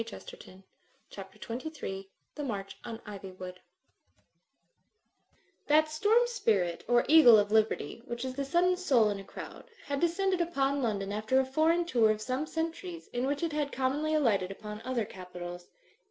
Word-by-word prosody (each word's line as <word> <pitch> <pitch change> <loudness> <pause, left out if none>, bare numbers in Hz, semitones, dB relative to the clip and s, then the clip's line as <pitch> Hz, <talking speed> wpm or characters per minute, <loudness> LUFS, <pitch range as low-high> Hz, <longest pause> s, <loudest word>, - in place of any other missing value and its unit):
Digitized 230 -1 -8
by - - -13 0.2
CjOOQIC 190 - -18 0.5
CHAPTER 195 +3 -9 0.2
XXIII 195 -11 -6 0.2
THE 295 - -5
MARCH 200 -7 -4
ON 230 -2 -6
IVYWOOD 185 -3 -8 2.1
That 310 +1 +4
storm 425 +10 +3
spirit, 215 - 0
or 240 0 +3
eagle 290 -7 +9
of 205 0 +1
liberty, 220 +1 +1
which 240 +1 -4
is 260 - -3
the 280 +2 -3
sudden 350 +6 +2
soul 255 - +3
in 200 - -4
a - - -8
crowd, - - -10 0.2
had 280 -1 -2
descended 360 +2 +1
upon 280 -4 0
London 200 -5 -1
after 215 +5 +1
a 265 - +2
foreign 320 +6 +2
tour 235 -9 +3
of 215 0 +1
some 255 +7 -2
centuries 330 +2 -4
in 245 +2 0
which 285 +3 -1
it 330 -2 -1
had 295 -1 -1
commonly 290 +4 0
alighted 210 -11 +2
upon 210 +2 -8
other 250 -3 -1
capitals. 175 -2 -9
255 Hz, 165 wpm, -30 LUFS, 205-310 Hz, 2.1 s, eagle